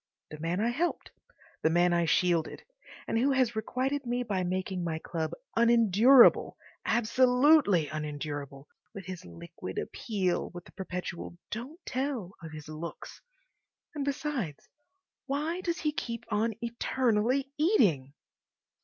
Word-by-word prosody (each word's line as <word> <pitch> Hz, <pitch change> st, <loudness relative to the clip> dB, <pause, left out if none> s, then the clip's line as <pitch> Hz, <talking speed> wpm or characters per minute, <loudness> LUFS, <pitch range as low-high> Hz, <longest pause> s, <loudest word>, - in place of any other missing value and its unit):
The 150 Hz, -, -8 dB
man 170 Hz, +4 st, -1 dB
I 225 Hz, +3 st, +2 dB
helped, 320 Hz, +9 st, -2 dB, 0.5 s
the 160 Hz, -, +3 dB
man 175 Hz, +1 st, +3 dB
I 170 Hz, 0 st, +2 dB
shielded, 170 Hz, -1 st, +1 dB, 0.4 s
and 225 Hz, -, +1 dB
who 275 Hz, +3 st, +3 dB
has 255 Hz, -3 st, +2 dB
requited 260 Hz, +6 st, -1 dB
me 245 Hz, 0 st, -1 dB
by 200 Hz, -5 st, -1 dB
making 185 Hz, 0 st, -2 dB
my 165 Hz, -2 st, -2 dB
club 160 Hz, 0 st, -3 dB, 0.3 s
unendurable, 235 Hz, +2 st, +6 dB, 0.3 s
absolutely 250 Hz, -, +4 dB
unendurable, 145 Hz, -2 st, -5 dB, 0.3 s
with 195 Hz, -3 st, -7 dB
his 185 Hz, -1 st, -7 dB
liquid 85 Hz, 0 st, -9 dB
appeal, 190 Hz, -5 st, -1 dB
with 175 Hz, -, -8 dB
the -, -, -15 dB
perpetual 180 Hz, -2 st, -6 dB
"don't 255 Hz, +10 st, -6 dB
tell" 255 Hz, -7 st, -2 dB
of 165 Hz, -1 st, -8 dB
his 150 Hz, -1 st, -9 dB
looks. 155 Hz, +2 st, -8 dB, 0.7 s
And, 295 Hz, -3 st, -3 dB
besides, 275 Hz, -, -3 dB, 0.6 s
why 305 Hz, +6 st, -1 dB
does 340 Hz, -2 st, -1 dB
he 305 Hz, -, 0 dB
keep 235 Hz, -5 st, -5 dB
on 220 Hz, +1 st, +1 dB
eternally 240 Hz, +2 st, 0 dB
eating? 180 Hz, -, +3 dB
215 Hz, 130 wpm, -29 LUFS, 170-260 Hz, 0.7 s, unendurable